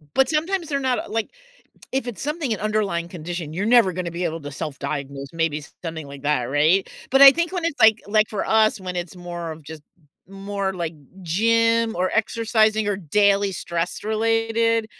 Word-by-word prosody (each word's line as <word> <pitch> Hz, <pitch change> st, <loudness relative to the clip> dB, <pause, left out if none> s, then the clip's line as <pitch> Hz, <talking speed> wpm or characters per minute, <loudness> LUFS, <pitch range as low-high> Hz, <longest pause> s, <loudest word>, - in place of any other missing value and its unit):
But 265 Hz, -1 st, +4 dB
sometimes 330 Hz, +2 st, -1 dB
they're 280 Hz, -2 st, -1 dB
not, 260 Hz, -2 st, 0 dB
uh, -, -, -5 dB
like 225 Hz, +1 st, -2 dB, 0.6 s
if 265 Hz, -2 st, -2 dB
it's 235 Hz, -, -6 dB
something 295 Hz, -4 st, -2 dB
an 215 Hz, -, -5 dB
underlying 205 Hz, -5 st, -1 dB
condition, 170 Hz, -2 st, -6 dB
you're 190 Hz, +5 st, -2 dB
never 225 Hz, -6 st, +5 dB
gonna 175 Hz, -1 st, -4 dB
be 175 Hz, +1 st, -4 dB
able 165 Hz, -1 st, -3 dB
to 145 Hz, -, -7 dB
self-diagnose, 140 Hz, -1 st, -5 dB
maybe 165 Hz, -2 st, -1 dB, 0.2 s
something 160 Hz, -3 st, -5 dB
like 140 Hz, -1 st, -10 dB
that, 145 Hz, -4 st, +1 dB
right? 155 Hz, +9 st, +2 dB, 0.2 s
But 270 Hz, +1 st, +4 dB
I 275 Hz, -1 st, +12 dB
think 340 Hz, +3 st, -1 dB
when 360 Hz, -3 st, -2 dB
it's 335 Hz, -3 st, -2 dB
like 220 Hz, 0 st, +6 dB
like 215 Hz, 0 st, +3 dB
for 210 Hz, -, -3 dB
us, 220 Hz, -1 st, +3 dB
when 180 Hz, -1 st, -6 dB
it's 175 Hz, 0 st, -5 dB
more 175 Hz, -2 st, -6 dB
of 160 Hz, 0 st, -10 dB
just 155 Hz, +1 st, -10 dB, 0.5 s
more 195 Hz, 0 st, -3 dB
like 170 Hz, -2 st, -4 dB, 0.3 s
gym 230 Hz, +5 st, +2 dB
or 185 Hz, +1 st, +1 dB
exercising 220 Hz, -1 st, +1 dB
or 205 Hz, -, +1 dB
daily 200 Hz, +3 st, +2 dB
stress 170 Hz, -1 st, -3 dB
related, 225 Hz, +1 st, +1 dB
200 Hz, 190 wpm, -22 LUFS, 165-230 Hz, 0.6 s, I